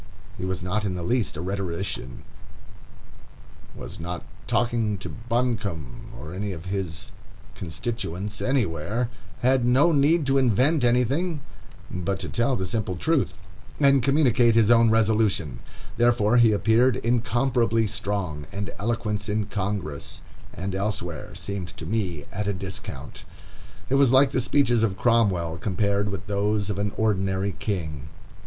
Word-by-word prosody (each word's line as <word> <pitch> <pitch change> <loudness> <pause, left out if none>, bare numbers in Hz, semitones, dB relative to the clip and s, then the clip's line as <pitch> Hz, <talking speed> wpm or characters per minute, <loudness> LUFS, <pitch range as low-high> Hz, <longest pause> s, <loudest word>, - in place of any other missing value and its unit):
He - - -5
was 95 -1 -3
not 100 +4 -1
in 95 -3 -1
the 90 - -4
least 115 -2 0
a - - -4
rhetorician, 90 -8 -4 1.5
was - - -8
not 85 +1 -5 0.2
talking 115 -3 +1
to 100 - -7
Buncombe 115 - -3
or 80 +3 -8
his 95 -2 -4 0.4
constituents 95 +3 -4
anywhere, 115 - 0 0.3
had 130 0 +3
no 130 +7 +4
need 150 +2 +3
to 135 0 +3
invent 130 +4 +3
anything 135 +7 +2 0.5
but 90 +2 -2
to - - -4
tell 120 +3 +1
the 95 - -2
simple 95 -1 -2
truth, 130 - 0 0.4
and 140 -2 +5
communicate 125 -4 +4
his 115 -1 +5
own 115 -1 +6
resolution; 110 - +2 0.4
therefore 120 -1 +3
he 120 -2 +6
appeared 115 +4 +3
incomparably 120 0 +1
strong, 100 -8 -3
and 100 0 -4
eloquence 105 -2 -2
in 105 0 0
Congress 100 -8 -4 0.3
and 95 +1 -4
elsewhere 95 -4 -3
seemed 95 -2 -5
to - - -7
me 95 -9 -2
at 105 +1 -3
a 100 - +1
discount. 95 0 -6 0.6
It - - -2
was 135 -3 +5
like 135 +1 +5
the 130 - +1
speeches 125 -2 +3
of 100 -4 +1
Cromwell 95 -9 +2
compared 100 +1 0
with 100 0 -5
those 105 0 0
of 100 - -3
an 100 0 0
ordinary 95 -2 +1
king. 80 -8 -3
105 Hz, 135 wpm, -25 LUFS, 95-120 Hz, 1.5 s, own